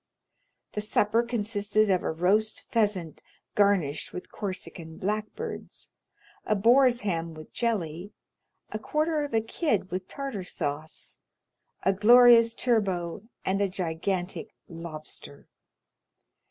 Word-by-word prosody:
The 210 - -3
supper 210 +1 +2
consisted 215 -3 0
of 185 - +2
a - - -1
roast 200 +7 +1
pheasant 205 -8 0 0.3
garnished 190 -8 +2
with 180 - -7
Corsican 175 -4 -6
blackbirds; 215 - -4 0.5
a 215 - +1
boar's 240 +4 +5
ham 165 -5 -2
with 155 0 -12
jelly, 195 -5 -2 0.6
a 215 - -3
quarter 305 +5 0
of 285 -6 -3
a 225 - +4
kid 220 - -1
with 185 +1 -3
tartar 270 -9 -5
sauce, 155 -2 -5 0.6
a 195 - +3
glorious 230 +2 +7
turbot, 195 -6 0 0.2
and 195 +1 +1
a 200 - +2
gigantic 180 +1 -3
lobster. 155 -4 -9
205 Hz, 115 wpm, -27 LUFS, 175-230 Hz, 0.6 s, glorious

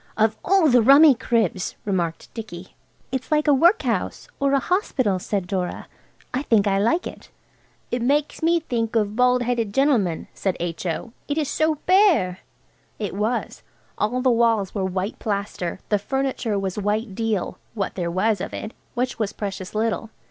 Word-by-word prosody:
"Of 220 0 +3
all 380 -3 +4
the 250 -3 +5
rummy 280 +5 +8
cribs!" 225 -7 -1
remarked 175 -5 -2
Dicky. 190 -6 -8 0.4
"It's 260 +2 -4
like 305 0 +2
a 295 - +6
workhouse 345 - +2
or 280 0 +2
a 275 - +4
hospital," 255 - 0
said 195 0 -2
Dora. 180 -1 -3 0.5
"I 255 - 0
think 225 -7 +3
I 195 -1 +2
like 235 - +1
it." - - -9 0.6
"It 245 - -1
makes 285 +4 0
me 335 +1 +3
think 230 -7 -2
of 210 -2 +1
bald 250 0 +3
headed 235 -3 -1
gentlemen," 240 - +2
said. 190 -2 -2
H.O., 175 +6 -4
"it 290 - -2
is 300 -3 0
so 315 +1 +1
bare." 360 - +4 0.6
It 205 -3 -4
was. 215 +5 -2 0.3
All 245 +4 -1
the 260 - +4
walls 230 -4 +2
were 200 - -2
white 190 +2 -3
plaster, 200 -4 -3
the 210 - +2
furniture 260 -2 -1
was 195 0 -2
white 210 +1 -1
deal–what 215 -1 -3
there 175 -2 -2
was 190 +3 +1
of - - -5
it, 215 - -5 0.2
which 250 0 -2
was 215 -2 -1
precious 195 -1 -6
little. 225 +1 -1
225 Hz, 165 wpm, -23 LUFS, 195-265 Hz, 0.6 s, rummy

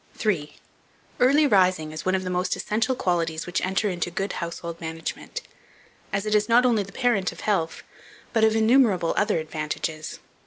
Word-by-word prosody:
3. 155 -9 -1 0.6
EARLY 280 +5 +5
RISING 185 - +3
IS 155 0 -6
ONE 185 - +3
OF 185 - -1
THE 185 - -3
MOST 180 +1 0
ESSENTIAL 225 +5 0
QUALITIES 165 -5 -1
which 175 - -1
enter 190 +3 0
into 175 -2 -2
good 195 +3 -3
Household 170 0 -5
Management, 165 - -5 0.7
as 195 +1 -1
it 215 - 0
is 210 +1 +2
not 240 +2 +5
only 235 -4 +3
the 200 0 -7
parent 215 -9 +1
of - - -11
health, 180 -6 -1 0.5
but 225 -2 +3
of 220 0 +4
innumerable 220 -6 +4
other 205 -3 +2
advantages. 155 0 -4
185 Hz, 170 wpm, -25 LUFS, 165-220 Hz, 0.7 s, EARLY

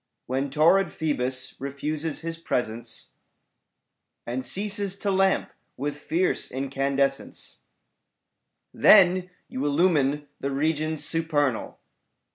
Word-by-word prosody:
When 135 +2 -1
torrid 165 +6 +4
Phoebus 130 -4 -2
refuses 145 +3 -3
his 165 0 -4
presence 120 -7 -3 1.1
And 125 +2 -3
ceases 200 - 0
to 200 0 -1
lamp 190 0 +2 0.3
with 145 +2 -3
fierce 170 +5 0
incandescence^ 135 +1 -2 1.2
Then 185 -2 +6 0.2
you 130 - -4
illumine 145 -2 +2
the 140 - -2
regions 155 +2 -1
supernal. 150 -7 0
145 Hz, 90 wpm, -25 LUFS, 135-165 Hz, 1.2 s, Then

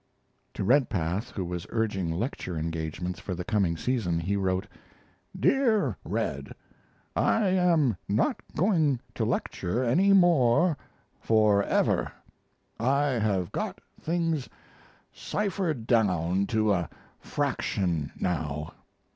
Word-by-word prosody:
To - - -2
Redpath, 105 - +1
who 95 -6 -4
was 90 0 -5
urging 105 -7 -1
lecture 90 - -3
engagements 80 +2 -3
for 95 - -4
the 90 - -4
coming 100 -7 +1
season, 100 -7 0
he 95 +5 -1
wrote: 95 -1 0 0.7
DEAR 240 -6 +2
RED, - - -3 0.6
I 215 -4 +2
am 170 - +3
not 105 +4 +1 0.2
going 160 - +2
to - - -2
lecture 110 +9 -1
any 180 +12 +3
more 170 -4 +4 0.4
forever. 105 -2 +2 0.7
I 140 +5 +2
have 100 -5 0
got - - -3 0.2
things 165 -4 -1 0.6
ciphered 185 - -2
down 95 -5 +2
to 110 -2 +2
a 85 -3 -1 0.3
fraction 85 -7 -1
now. 75 -4 -2
110 Hz, 105 wpm, -27 LUFS, 90-145 Hz, 0.7 s, more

